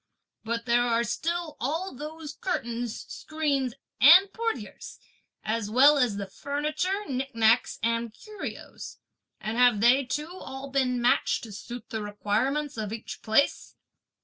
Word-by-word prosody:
But 230 +1 -3
there 240 0 +3
are 235 -1 +2
still 330 +7 -3
all 325 +9 -2
those 300 +2 -7
curtains, 240 - -3
screens 280 -6 -2 0.2
and 365 +8 +8
portieres, 455 -1 -4 0.5
as 215 -1 -2
well 280 +6 +6
as 240 -6 +1
the 200 - -3
furniture, 305 - -2
nicknacks 250 -4 +2
and 230 0 0
curios; 420 - -8 0.4
and 220 +2 -4
have 245 -4 +5
they 245 +5 +5
too 300 +6 -4
all 270 +1 -8
been 255 -2 +1
matched 240 +1 +2
to 225 - -8
suit 235 +6 -9
the 220 -2 -3
requirements 230 +8 -1
of 215 -2 -3
each 225 0 -7
place?" 220 +6 +1
250 Hz, 135 wpm, -27 LUFS, 230-300 Hz, 0.5 s, and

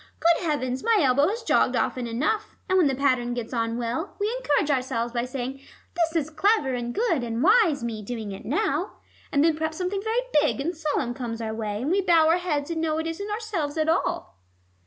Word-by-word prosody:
Good 340 +1 +3
heavens, 260 -4 -1
my 460 -1 +4
elbow 280 -1 +4
has 455 +5 -3
jogged - - +2
often 250 -2 -1
enough! 300 - -1
And 375 - +1
when 360 -5 +5
the 270 - 0
pattern 255 -3 +1
gets 240 0 -5
on 230 -1 -1
well, 245 - -3
we 425 +4 0
encourage 295 -8 +1
ourselves 250 -3 -1
by 240 0 -1
saying, 260 +1 -5 0.4
'This 335 -1 0
is 295 - -11
clever 315 -3 +2
and 240 -1 -3
good 345 - 0
and 230 +1 -2
wise 365 - +4
Me 225 -2 -3
doing 220 -1 -5
it 195 - -8
now!' 300 - -1 0.4
And 285 - +3
then 325 -1 +3
perhaps 315 0 -3
something 380 +2 -2
very 445 +3 0 0.2
big 300 -2 0
and 335 +6 -2
solemn 295 -6 -1
comes 240 -3 -5
our 220 -1 -3
way, 215 0 -3
and 295 - 0
we 395 +2 +3
bow 335 -4 +4
our 330 +2 +4
heads, 315 -4 -2
and 325 -1 -2
know 315 -1 0
it 320 - -2
isn't 330 +6 -4
ourselves 415 -9 -3
at 315 0 +1
all." 340 - -1
295 Hz, 220 wpm, -25 LUFS, 245-345 Hz, 0.4 s, when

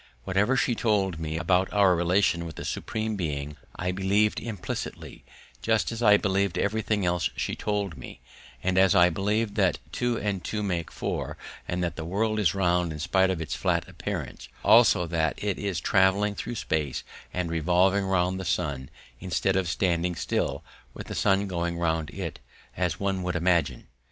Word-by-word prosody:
Whatever 105 - +1
she 125 - +2
told 100 -7 0
me 80 0 -3
about 90 +3 +1
our 100 -3 +4
relations 85 0 +2
with 80 -3 -7
the - - -7
Supreme 110 -1 -3
Being 75 -5 -3 0.2
I 90 +1 -2
believed 100 +3 +1
implicitly, 110 -5 -6 0.4
just - - +1
as 115 0 -5
I 105 -3 +7
believed 100 -2 0
everything 105 -1 0
else 90 -1 +1
she - - -2
told 100 -8 -2
me, 60 - -10 0.4
and 95 0 +2
as 95 +1 +5
I 90 -1 +6
believed 105 +4 0
that - - +3
two 120 -1 0
and 100 -5 -2
two 105 +3 -3
make 85 -4 -2
four - - -4 0.3
and 90 0 -1
that 85 -2 -3
the 80 - -4
world 110 +6 0
is 95 -4 +2
round 90 -3 +1
in 75 - -5
spite 95 +5 +2
of 90 -3 -1
its 80 - -4
flat - - 0
appearance; - - -6 0.2
also 90 - +6
that 80 -1 0
it 100 -3 -2
is 100 -4 -2
travelling 100 +3 +3
through 120 +3 -5
space 75 - -2 0.3
and 90 -2 -2
revolving 90 +5 +2
round 95 0 +1
the - - -4
sun 70 -6 -2 0.3
instead 95 +1 0
of 95 -3 +1
standing 85 0 0
still, - - -2 0.3
with - - -7
the - - -4
sun 100 +1 +2
going 85 -2 -2
round 80 -2 0
it, - - -6 0.4
as 90 -2 -1
one 95 -1 -1
would 90 -1 -2
imagine. 85 -3 +1
95 Hz, 175 wpm, -27 LUFS, 85-100 Hz, 0.4 s, I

